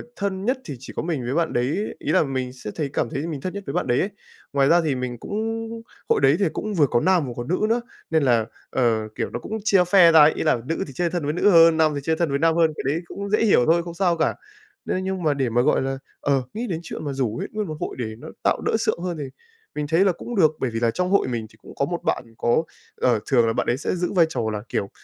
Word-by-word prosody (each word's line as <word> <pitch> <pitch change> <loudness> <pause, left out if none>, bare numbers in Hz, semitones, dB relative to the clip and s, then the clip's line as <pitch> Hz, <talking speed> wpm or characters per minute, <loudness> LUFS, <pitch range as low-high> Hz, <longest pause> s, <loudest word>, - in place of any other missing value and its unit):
thân 195 -1 -3
nhất 255 +3 +1
thì 145 - -6
chỉ 130 - -10
có - - -1
mình 160 -6 -2
với 125 - -2
bạn 165 +1 0
đấy. 135 - -1
Ý - - -2
là - - +4
mình 130 -3 -3
sẽ 125 -5 -7
thấy 150 -3 -2
cảm 115 - 0
thấy 140 +7 -3
mình 150 -5 -5
thân 185 - -4
nhất 200 0 -6
với 140 - -3
bạn 180 - -1
đấy 120 - +2
ấy. 195 - 0 0.4
Ngoài 140 -1 +3
ra 175 +1 +5
thì 155 -5 0
mình 125 -1 -4
cũng - - -9 0.8
hội - - +3
đấy 135 +1 +5
thì 200 - +3
cũng 215 - -3
vừa 150 -7 +4
có 120 - +2
nam 185 -5 +3
vừa 120 - -5
có 120 - -4
nữ 175 +9 -1
nữa 235 +2 +2 0.3
nên 160 -2 +2
là, 120 -4 +3 0.2
ờ, 115 -4 +1
kiểu, - - -2
nó - - -5
cũng 215 - -5
chia 195 -4 +4
phe 180 -4 +8
ra 160 - +7
ấy, 150 +1 +7
ý - - -3
là 155 - +3
nữ 165 +5 -2
thì 140 - -10
chơi 170 +6 0
thân 175 -2 -3
với 145 +1 -1
nữ 180 +5 +3
hơn, 165 -2 +7
nam 160 -1 +4
thì - - -2
chơi 160 +3 +1
thân 170 -1 0
với 140 0 0
nam 165 +1 +3
hơn, 165 -2 +3
cái - - -4
đấy 165 - -2
cũng 200 +3 -6
dễ 215 - +2
hiểu 185 - +4
thôi 170 +1 +3
không 170 0 -7
sao 175 -1 +1
cả. - - +1 0.5
Nên 185 - -1
nhưng 190 -1 -3
mà 150 -2 +3
để 135 -3 -1
mà 120 +2 +2
gọi - - +2
là, 135 0 -2 0.2
ờ, 140 -2 +2
nghĩ 235 +3 -3
đến 170 -6 -2
chuyện 160 - -7
mà 140 - -2
rủ 125 -5 -1
ấy - - -3
nguyên 210 -1 -3
một 155 - -5
hội - - -4
để 110 -3 -4
nó - - -11 0.2
tạo - - +2
đỡ - - +2
sượng - - 0
hơn 175 -2 -3
thì 150 - -4 0.5
mình 150 -1 -2
thấy 165 +5 +3
là 195 - +4
cũng 235 +7 -7
được. 155 -6 +4
Bởi 130 - 0
vì 115 0 -3
là 115 0 +2
trong 180 +8 -1
hội 200 +1 +3
mình 120 -3 -3
thì - - -21
cũng - - -13
có - - 0
một - - -4
bạn - - 0
có 120 +7 +2 0.3
ờ, 120 -3 +2
thường 120 -4 +3
là 115 - +1
bạn - - -1
ấy 120 - +1
sẽ 150 - -2
giữ 175 0 -2
vai 175 -4 +5
trò 160 - -2
là, 105 -1 -4
kiểu, 100 - -2
155 Hz, 300 wpm, -23 LUFS, 130-180 Hz, 0.8 s, phe